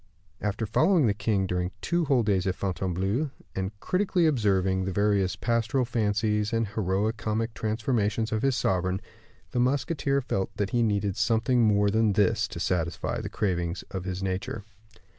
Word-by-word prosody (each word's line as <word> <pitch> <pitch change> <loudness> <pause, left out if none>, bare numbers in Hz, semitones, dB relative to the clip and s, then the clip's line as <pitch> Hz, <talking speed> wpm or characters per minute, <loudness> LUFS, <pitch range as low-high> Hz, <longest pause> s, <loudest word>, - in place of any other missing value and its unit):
After 105 +2 -1
following 155 - +3
the 105 - +3
king 100 -2 0
during 90 -1 -1
two 170 -1 0
whole 135 -5 +3
days 95 -3 +1
at 95 - 0
Fontainebleau, 95 - -1 0.3
and 95 0 -2
critically 185 - +1
observing 95 - +2
the 95 - -2
various 100 -1 +1
pastoral 120 +3 0
fancies 105 -2 0
and 115 -1 +1
heroi 105 +1 0
comic 110 +1 -2
transformations 110 0 -1
of 110 -1 0
his 135 -1 +2
sovereign, 95 -4 0 0.5
the 125 - -1
musketeer 140 +2 +1
felt 100 -7 -3
that 100 -1 -1
he 120 -2 +2
needed 100 -3 0
something 115 +3 +2
more 105 -2 +3
than 110 -1 +3
this 100 -2 +2
to - - -7
satisfy 85 -2 -1
the - - -5
cravings 90 -3 -1
of 95 -1 -4
his 95 0 -3
nature. 95 +1 -3
105 Hz, 160 wpm, -27 LUFS, 95-115 Hz, 0.5 s, following